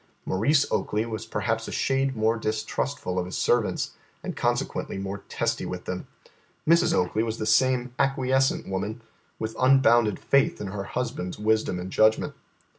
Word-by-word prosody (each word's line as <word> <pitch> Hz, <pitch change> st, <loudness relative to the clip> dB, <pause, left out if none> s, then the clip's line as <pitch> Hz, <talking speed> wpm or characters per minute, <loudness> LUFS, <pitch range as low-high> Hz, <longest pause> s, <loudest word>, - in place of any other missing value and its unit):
Maurice 140 Hz, +10 st, +3 dB
Oakley 105 Hz, +2 st, 0 dB
was 110 Hz, -2 st, -5 dB
perhaps 110 Hz, +2 st, -1 dB
a -, -, -5 dB
shade 135 Hz, 0 st, 0 dB
more 110 Hz, +1 st, +2 dB
distrustful 110 Hz, -1 st, -2 dB
of 90 Hz, -, -2 dB
his 90 Hz, -, -4 dB
servants, 120 Hz, -3 st, +1 dB, 0.3 s
and -, -, -4 dB
consequently -, -, -1 dB
more 100 Hz, +1 st, -4 dB
testy -, -, -1 dB
with -, -, -5 dB
them. -, -, -4 dB, 0.6 s
Mrs. 170 Hz, +2 st, +5 dB
Oakley 90 Hz, +4 st, +1 dB
was 115 Hz, 0 st, -2 dB
the 110 Hz, -, -3 dB
same 125 Hz, +2 st, +2 dB
acquiescent 135 Hz, -1 st, +1 dB
woman, 105 Hz, +4 st, -3 dB, 0.4 s
with 110 Hz, 0 st, -4 dB
unbounded 120 Hz, -5 st, +5 dB
faith 140 Hz, 0 st, +2 dB
in 105 Hz, -, -4 dB
her 100 Hz, 0 st, -4 dB
husband's 115 Hz, -7 st, -3 dB
wisdom 110 Hz, -3 st, +1 dB
and 90 Hz, +1 st, -6 dB
judgment. 110 Hz, +2 st, +3 dB
110 Hz, 155 wpm, -26 LUFS, 105-130 Hz, 0.6 s, Mrs